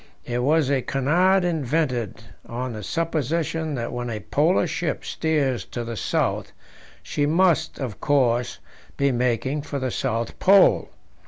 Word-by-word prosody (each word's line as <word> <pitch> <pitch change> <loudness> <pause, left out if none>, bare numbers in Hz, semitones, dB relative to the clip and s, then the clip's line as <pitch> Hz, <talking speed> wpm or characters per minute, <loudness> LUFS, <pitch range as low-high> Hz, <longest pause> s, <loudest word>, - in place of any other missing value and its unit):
It 120 0 -2
was 145 +1 +2
a 135 -2 +2
canard 175 +9 +2
invented 135 - -1 0.2
on 125 +1 -4
the 110 - -6
supposition 160 - -1
that 120 -1 -4
when 120 0 -3
a 110 -2 -3
Polar 155 - +2
ship 165 -1 -3
steers 145 -6 0
to 120 - -5
the 115 0 -5
south, 95 - -1 0.5
she 145 -1 -1
must, 165 -1 +2
of 125 -8 -5
course, 125 -4 +1 0.4
be 140 0 +2
making 125 +3 0
for 140 0 -5
the 130 -2 -2
South 115 -3 -2
Pole. 195 +1 +5
140 Hz, 145 wpm, -24 LUFS, 120-160 Hz, 0.5 s, Pole